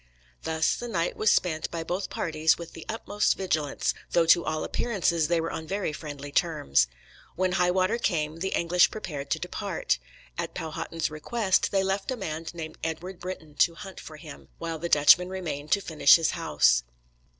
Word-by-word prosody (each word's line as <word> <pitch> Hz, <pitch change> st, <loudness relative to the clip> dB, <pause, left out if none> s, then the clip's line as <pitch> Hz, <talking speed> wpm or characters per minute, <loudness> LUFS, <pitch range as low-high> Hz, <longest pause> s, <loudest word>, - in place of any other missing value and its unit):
Thus 160 Hz, 0 st, +1 dB
the 240 Hz, -, -6 dB
night 175 Hz, -7 st, -1 dB
was 215 Hz, -, +3 dB
spent 160 Hz, -3 st, +1 dB
by 165 Hz, -1 st, -4 dB
both 180 Hz, +4 st, -3 dB
parties 160 Hz, -1 st, +1 dB
with 170 Hz, -1 st, -9 dB
the 165 Hz, -, -10 dB
utmost 210 Hz, -2 st, 0 dB
vigilance, 155 Hz, -7 st, 0 dB, 0.2 s
though 170 Hz, -1 st, +4 dB
to 170 Hz, +1 st, +5 dB
all 155 Hz, 0 st, -2 dB
appearances 170 Hz, -8 st, 0 dB
they 170 Hz, -1 st, +2 dB
were 165 Hz, 0 st, -2 dB
on 160 Hz, -1 st, -6 dB
very 195 Hz, -4 st, -2 dB
friendly 145 Hz, -2 st, -7 dB
terms. 105 Hz, -, +2 dB, 0.5 s
When 185 Hz, +1 st, +1 dB
high 180 Hz, -1 st, +2 dB
water 185 Hz, +5 st, +1 dB
came 160 Hz, -7 st, -1 dB
the 190 Hz, -, -1 dB
English 175 Hz, +1 st, +4 dB
prepared 145 Hz, -9 st, -6 dB
to -, -, +1 dB
depart. 65 Hz, -, -2 dB, 0.4 s
At -, -, -4 dB
Powhatan's 160 Hz, 0 st, -3 dB
request 190 Hz, +6 st, 0 dB
they 195 Hz, -1 st, +2 dB
left 195 Hz, +1 st, -1 dB
a 255 Hz, -, -1 dB
man 160 Hz, -4 st, -5 dB
named 160 Hz, -2 st, -8 dB
Edward 175 Hz, +3 st, -4 dB
Brynton 175 Hz, -4 st, -7 dB
to 170 Hz, -, +4 dB
hunt 190 Hz, +1 st, -9 dB
for 155 Hz, -, -10 dB
him, 150 Hz, -2 st, -11 dB
while 165 Hz, -1 st, -4 dB
the 170 Hz, +2 st, -3 dB
Dutchmen 170 Hz, +5 st, +6 dB
remained 160 Hz, -6 st, -5 dB
to 200 Hz, -, +2 dB
finish 160 Hz, -6 st, +6 dB
his 165 Hz, -1 st, +2 dB
house. 75 Hz, -, +3 dB
165 Hz, 185 wpm, -27 LUFS, 155-185 Hz, 0.5 s, Dutchmen